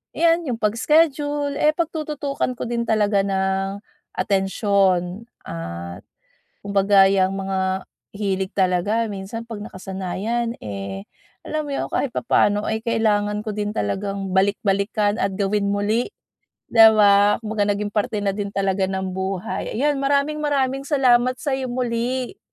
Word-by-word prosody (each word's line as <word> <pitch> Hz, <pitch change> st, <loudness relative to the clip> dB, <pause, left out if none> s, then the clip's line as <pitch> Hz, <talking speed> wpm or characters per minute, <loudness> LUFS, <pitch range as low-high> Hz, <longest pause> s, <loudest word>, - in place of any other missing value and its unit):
yan 335 Hz, 0 st, +3 dB
yung 245 Hz, -, -1 dB
pag-iskedyul 290 Hz, +5 st, +1 dB
eh, 305 Hz, 0 st, +4 dB
pagtututukan 300 Hz, -5 st, -2 dB
ko -, -, -5 dB
din 235 Hz, -1 st, -1 dB
talaga 210 Hz, -2 st, +2 dB
ng 195 Hz, 0 st, -1 dB, 0.3 s
atensiyon, 195 Hz, 0 st, +1 dB, 0.2 s
at 85 Hz, +1 st, -6 dB, 0.6 s
kumbaga 200 Hz, -1 st, +4 dB
yang 190 Hz, -1 st, +2 dB
mga 190 Hz, -1 st, -2 dB, 0.2 s
hilig 195 Hz, -1 st, -2 dB
talaga 200 Hz, +4 st, +1 dB
minsan 210 Hz, +4 st, -6 dB
'pag 210 Hz, -2 st, -6 dB
nakasanayan 195 Hz, +5 st, -3 dB
eh, 100 Hz, -1 st, -6 dB, 0.3 s
alam 310 Hz, 0 st, -3 dB
mo 285 Hz, -, -5 dB
yun -, -, -2 dB
kahit 265 Hz, -4 st, -1 dB
papaano, 205 Hz, -3 st, +1 dB
ay 220 Hz, +1 st, -2 dB
kailangan 210 Hz, -2 st, +1 dB
ko 215 Hz, 0 st, -5 dB
din 210 Hz, 0 st, -2 dB
talagang 195 Hz, -, -2 dB
balik-balikan 200 Hz, +1 st, +1 dB
at 195 Hz, 0 st, 0 dB
gawin 200 Hz, +1 st, 0 dB
muli, 210 Hz, +4 st, 0 dB, 0.7 s
'di 225 Hz, -1 st, +9 dB
ba. 205 Hz, 0 st, +5 dB
Kumbaga, 210 Hz, -1 st, 0 dB
naging 205 Hz, 0 st, -1 dB
parte 210 Hz, 0 st, -1 dB
na 195 Hz, -, +1 dB
din 200 Hz, 0 st, -3 dB
talaga 195 Hz, -1 st, +1 dB
ng 190 Hz, -1 st, -3 dB
buhay. 190 Hz, +2 st, -3 dB
Ayan 285 Hz, +3 st, +1 dB
maraming, 280 Hz, +2 st, +1 dB
maraming 275 Hz, -3 st, 0 dB
salamat 255 Hz, -3 st, +3 dB
sa'yo 265 Hz, -1 st, -2 dB
muli. 250 Hz, +6 st, -2 dB
205 Hz, 135 wpm, -22 LUFS, 195-245 Hz, 0.7 s, di